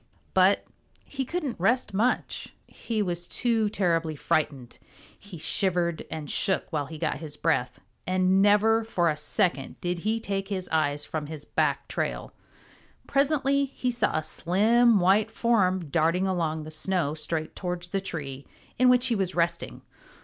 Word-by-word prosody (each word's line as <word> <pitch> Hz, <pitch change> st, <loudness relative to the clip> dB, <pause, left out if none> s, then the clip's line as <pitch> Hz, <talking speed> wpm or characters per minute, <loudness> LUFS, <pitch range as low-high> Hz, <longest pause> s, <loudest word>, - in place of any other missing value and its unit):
But 190 Hz, +1 st, +4 dB, 0.4 s
he 270 Hz, -2 st, -4 dB
couldn't 300 Hz, -, -3 dB
rest 230 Hz, +4 st, +1 dB
much. 225 Hz, +6 st, -1 dB
He 220 Hz, -3 st, -3 dB
was 175 Hz, -2 st, -3 dB
too 225 Hz, -3 st, +1 dB
terribly 165 Hz, -6 st, 0 dB
frightened. 140 Hz, -4 st, -2 dB, 0.4 s
He 200 Hz, -4 st, -11 dB
shivered 175 Hz, 0 st, -1 dB
and 155 Hz, -2 st, -5 dB
shook 190 Hz, +3 st, 0 dB
while 145 Hz, -2 st, -1 dB
he 160 Hz, +1 st, -8 dB
got -, -, -2 dB
his 150 Hz, -2 st, -7 dB
breath, 130 Hz, -6 st, 0 dB, 0.3 s
and 185 Hz, +1 st, +3 dB
never 210 Hz, +3 st, +4 dB
for 175 Hz, -7 st, +1 dB
a -, -, -3 dB
second 150 Hz, -1 st, -1 dB
did 175 Hz, 0 st, -2 dB
he 220 Hz, +5 st, 0 dB
take 195 Hz, -3 st, -3 dB
his 190 Hz, -3 st, -3 dB
eyes 145 Hz, -2 st, 0 dB
from 155 Hz, -2 st, -4 dB
his 150 Hz, -1 st, -8 dB
back -, -, 0 dB
trail. -, -, -3 dB, 0.7 s
Presently 280 Hz, 0 st, +2 dB
he 255 Hz, -2 st, -3 dB
saw 235 Hz, -8 st, 0 dB
a 155 Hz, -, -1 dB
slim 220 Hz, +8 st, +3 dB
white 195 Hz, +4 st, +3 dB
form 190 Hz, -9 st, +1 dB
darting 165 Hz, +4 st, +2 dB
along 165 Hz, -4 st, -1 dB
the 155 Hz, -, -9 dB
snow 165 Hz, -2 st, 0 dB
straight 155 Hz, +1 st, -3 dB
towards 180 Hz, -1 st, -4 dB
the 195 Hz, +2 st, -1 dB
tree 140 Hz, -7 st, -6 dB, 0.3 s
in 255 Hz, 0 st, +6 dB
which 250 Hz, 0 st, +5 dB
he 245 Hz, -3 st, +2 dB
was 190 Hz, -3 st, -2 dB
resting. 170 Hz, 0 st, -1 dB
185 Hz, 155 wpm, -27 LUFS, 160-220 Hz, 0.7 s, in